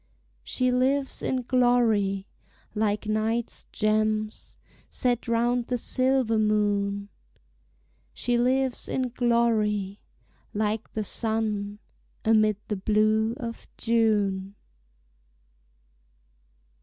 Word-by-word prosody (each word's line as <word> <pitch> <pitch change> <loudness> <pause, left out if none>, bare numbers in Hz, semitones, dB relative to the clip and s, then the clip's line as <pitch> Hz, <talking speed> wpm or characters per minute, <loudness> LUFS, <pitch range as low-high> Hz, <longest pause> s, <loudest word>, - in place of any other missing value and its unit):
She 255 -1 0
lives 270 +2 +1
in 255 -1 -1
glory, 235 -6 +2 0.5
like 210 0 0
night's 220 +2 -1
gems 215 0 -1 0.3
Set 245 -1 0
round 235 +1 +1
the 250 - 0
silver 255 -2 +1
moon; 205 -1 +1 1.0
She 245 - -1
lives 255 +1 +1
in 255 -1 -1
glory, 220 -5 +1 0.6
like 215 +1 -1
the 215 - -2
sun 210 -2 -1 0.5
Amid 215 -2 +4
the 210 - -2
blue 215 +3 +2
of 230 -2 -7
June. 205 -4 +1
220 Hz, 85 wpm, -26 LUFS, 210-240 Hz, 1.0 s, Amid